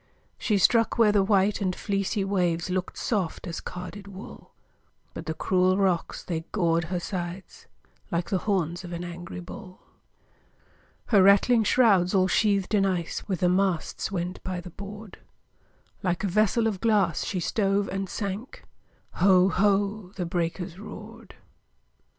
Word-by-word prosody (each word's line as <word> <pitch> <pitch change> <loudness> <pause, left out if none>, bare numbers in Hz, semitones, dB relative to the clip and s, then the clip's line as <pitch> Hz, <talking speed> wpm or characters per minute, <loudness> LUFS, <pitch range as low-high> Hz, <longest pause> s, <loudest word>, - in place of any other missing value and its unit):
She 210 -4 +1
struck 230 +4 +3
where 225 -3 +5
the 205 -1 +4
white 200 +1 +2
and 185 -2 0
fleecy 200 0 -1
waves 180 -3 0
Look'd 185 0 -2
soft 200 -7 -2
as 170 -2 -5
carded 180 +3 -8
wool, 195 +1 -11 0.6
But - - -8
the 160 - -2
cruel 185 +2 +2
rocks, 190 -4 0
they 165 -3 -2
gored 170 -4 +1
her 175 +2 -2
sides 180 +1 -6 0.4
Like 170 -2 -2
the 190 - +2
horns 180 -4 -1
of 175 -1 -7
an 170 +1 -4
angry 175 0 -7
bull. 185 +1 -10 1.3
Her 205 -4 +6
rattling 205 +4 +5
shrouds, 205 -6 +4
all 185 -1 +4
sheathed 200 +1 +1
in 205 -2 +4
ice, 180 -4 -2
With 190 -2 -2
the 180 - +4
masts 185 -1 0
went 180 -1 -4
by 185 -1 -3
the 180 0 -9
board; 205 +2 -10 0.8
Like 180 0 -1
a - - +1
vessel 215 +4 +2
of 210 -4 -1
glass, 215 -3 +2
she 185 - -2
stove 200 +2 +1
and 195 0 -3
sank, 205 +4 -5 0.5
Ho! 185 0 +5
ho! 200 0 +1
the 180 - -3
breakers 170 +1 -3
roared! 220 +2 -11
190 Hz, 150 wpm, -26 LUFS, 180-205 Hz, 1.3 s, Her